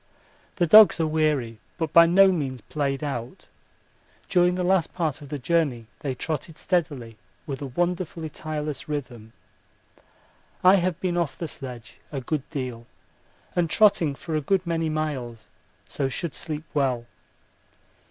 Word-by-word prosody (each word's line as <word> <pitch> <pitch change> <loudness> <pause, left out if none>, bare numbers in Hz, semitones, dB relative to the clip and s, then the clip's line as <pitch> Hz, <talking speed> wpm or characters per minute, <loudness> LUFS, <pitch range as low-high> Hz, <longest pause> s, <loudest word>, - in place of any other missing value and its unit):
The 175 - +2
dogs 210 +3 +8
are 165 - +2
weary 150 -8 0 0.2
but 160 -3 -3
by 170 0 +8
no 190 +3 +6
means 135 -7 -2
played 140 +4 -2
out 130 +2 -5 0.8
during 180 -1 +3
the 180 - -1
last 180 -2 +1
part 160 -6 -1
of 145 - -11
the 145 - -3
journey 140 -5 0
they 135 -4 -3
trotted 155 +3 -4
steadily 145 - -2 0.3
with 135 -2 -5
a 140 - -3
wonderfully 175 +3 -2
tireless 150 -2 -5
rhythm. 125 -7 -5 1.3
I 185 +2 +7
have 180 -1 -1
been 175 -2 0
off 170 -5 -1
the 165 - -4
sledge 125 -6 -9
a 140 - -3
good 135 +2 -3
deal 125 -5 -5 0.7
and 175 -2 +1
trotting 170 -4 +4
for 160 +3 -5
a 155 - +1
good 190 +5 +1
many 165 -1 -1
miles, 135 -8 -4 0.4
so 135 -2 -1
should 160 +4 -3
sleep 155 -1 -4
well. 130 -5 0
155 Hz, 150 wpm, -25 LUFS, 135-170 Hz, 1.3 s, dogs